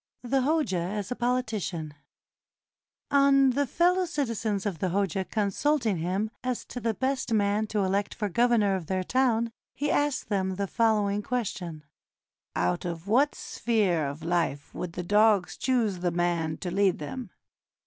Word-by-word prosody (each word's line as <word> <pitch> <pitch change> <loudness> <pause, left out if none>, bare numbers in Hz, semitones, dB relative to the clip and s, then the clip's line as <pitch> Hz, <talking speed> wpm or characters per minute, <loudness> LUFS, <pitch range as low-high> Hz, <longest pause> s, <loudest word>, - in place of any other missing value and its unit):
THE 265 +2 +1
HOJA 290 - +1
AS 200 +5 -3
A - - 0
POLITICIAN 220 -11 -2 1.2
On 275 -1 +5
the 280 +2 0
fellow 360 +7 +2
citizens 230 - -2
of 190 -6 -2
the 185 - 0
Hoja 190 0 -1
consulting 220 - +1
him 190 +6 -1
as 255 -1 -2
to 245 - -6
the 230 -2 -1
best 265 0 -1
man 210 0 +2
to 210 -1 0
elect 195 +2 0
for 210 - -1
governor 230 -1 +3
of 175 -4 -5
their 185 -1 -1
town, 235 0 +1 0.2
he 295 +2 -1
asked 290 -2 0
them 190 -2 0
the 200 +1 -1
following 210 -1 +1
question: 185 -10 -3 0.7
"Out 90 0 0
of 170 +1 -5
what 270 +8 +3
sphere 195 -10 0
of 145 +3 -6
life 165 -4 -1
would 175 -2 -5
the 180 - -4
dogs 205 0 +3
choose 230 -8 0
the 175 0 0
man 170 -2 0
to 180 - -4
lead 195 0 +2
them 205 - -6
205 Hz, 160 wpm, -27 LUFS, 180-245 Hz, 1.2 s, On